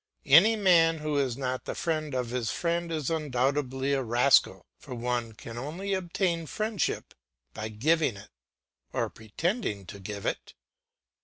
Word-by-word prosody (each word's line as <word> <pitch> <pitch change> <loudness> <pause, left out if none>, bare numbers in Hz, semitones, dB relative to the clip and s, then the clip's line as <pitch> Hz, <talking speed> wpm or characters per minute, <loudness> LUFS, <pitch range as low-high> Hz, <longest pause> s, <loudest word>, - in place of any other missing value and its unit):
Any 195 +11 +7
man 170 -5 +4
who 150 -1 -2
is 130 -3 0
not 130 -1 -3
the - - -4
friend 155 -4 -2
of 125 -2 -2
his 120 -2 -1
friend 170 0 -1
is 155 -2 -2
undoubtedly 135 -2 0
a 135 - +1
rascal; 120 +3 +3
for 125 - -8
one 120 -1 -2
can 115 +2 -8
only 175 +9 -4
obtain 175 -2 -1
friendship 215 +4 -2 0.4
by 110 +1 -5
giving 135 +2 +1
it, 100 - -13 0.6
or - - -1
pretending 115 - -3
to 100 +3 -9
give 100 +1 -6
it. - - -3
140 Hz, 150 wpm, -28 LUFS, 120-165 Hz, 0.6 s, Any